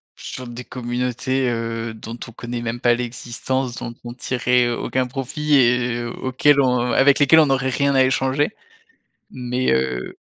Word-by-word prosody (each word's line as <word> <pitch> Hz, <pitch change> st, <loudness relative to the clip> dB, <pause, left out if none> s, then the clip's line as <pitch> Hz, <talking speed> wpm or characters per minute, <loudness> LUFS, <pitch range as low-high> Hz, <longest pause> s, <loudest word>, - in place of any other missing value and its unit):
sur 130 Hz, -1 st, -8 dB
des 120 Hz, +1 st, -8 dB
communautés, 125 Hz, +1 st, -2 dB
heu, 115 Hz, -1 st, -3 dB
dont 115 Hz, +1 st, -8 dB
on 115 Hz, -, -10 dB
connait 120 Hz, +1 st, -6 dB
même 120 Hz, +1 st, -3 dB
pas 120 Hz, 0 st, +4 dB
l'existence, 125 Hz, +1 st, -3 dB
dont 120 Hz, -, -6 dB
on 120 Hz, 0 st, -7 dB
tirerait 125 Hz, -1 st, +1 dB
aucun 125 Hz, +2 st, -1 dB
profit 145 Hz, +4 st, -1 dB
et 120 Hz, -2 st, +2 dB
auquel 130 Hz, +4 st, +2 dB
on 125 Hz, -1 st, +1 dB
avec 140 Hz, +3 st, +4 dB
lesquelles 145 Hz, +3 st, +6 dB
on 155 Hz, -, +6 dB
n'aurait 135 Hz, -1 st, +1 dB
rien 140 Hz, +1 st, +1 dB
à 130 Hz, -, +6 dB
échanger. 130 Hz, +3 st, +1 dB, 0.8 s
Mais 125 Hz, 0 st, -1 dB
heu. 65 Hz, -1 st, -1 dB
125 Hz, 155 wpm, -21 LUFS, 120-130 Hz, 0.8 s, lesquelles